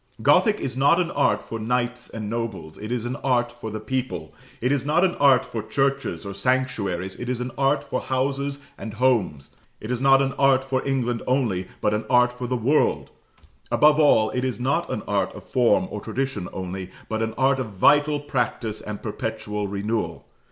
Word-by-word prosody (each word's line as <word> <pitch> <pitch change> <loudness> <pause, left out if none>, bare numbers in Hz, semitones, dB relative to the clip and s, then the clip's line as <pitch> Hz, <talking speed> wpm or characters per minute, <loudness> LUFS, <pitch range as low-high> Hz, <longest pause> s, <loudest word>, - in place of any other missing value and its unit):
Gothic 210 -3 +4
is 130 - -3
not 145 +6 +4
an 175 -1 0
art - - +1
for 115 - -6
knights 125 +2 -1
and 110 -2 -6
nobles; 110 -9 -4
it 110 +2 -6
is 120 -2 -2
an 125 +3 -3
art 120 -2 +1
for 120 -2 -7
the 110 0 -5
people: 130 +4 -4 0.3
it 125 +2 0
is 145 -3 +1
not 155 +5 +2
an 180 - +1
art 135 -3 +5
for 115 - -4
churches 135 -6 -1
or 100 - -5
sanctuaries; 100 -5 -1
it 125 - -4
is 125 -1 -1
an 125 +1 -3
art 140 +1 +2
for 130 - -3
houses 140 +2 -1 0.2
and 110 -1 -6
homes: 105 - +1 0.3
it 110 - -6
is 125 0 -2
not 135 0 +6
an 135 0 0
art 135 -1 +4
for 135 -1 -1
England 125 -3 0
only, 115 -9 0
but 105 - +2
an 105 +1 -1
art 125 -1 +4
for 125 0 -5
the 125 +1 0
world: 135 +7 +1 0.6
above 150 +1 +5
all, 110 -8 +4
it 125 - -2
is 130 -2 -2
not 135 +3 0
an - - -3
art - - 0
of - - -10
form 115 -7 +2
or 105 - -5
tradition 115 -4 -3
only, 95 0 -5 0.2
but 110 0 -2
an 110 0 -2
art 135 +1 +3
of 130 - -2
vital 145 +9 +3
practice 125 -6 -2
and 105 -1 -7
perpetual 110 -1 -3
renewal. 105 +3 -3
125 Hz, 200 wpm, -24 LUFS, 110-135 Hz, 0.6 s, not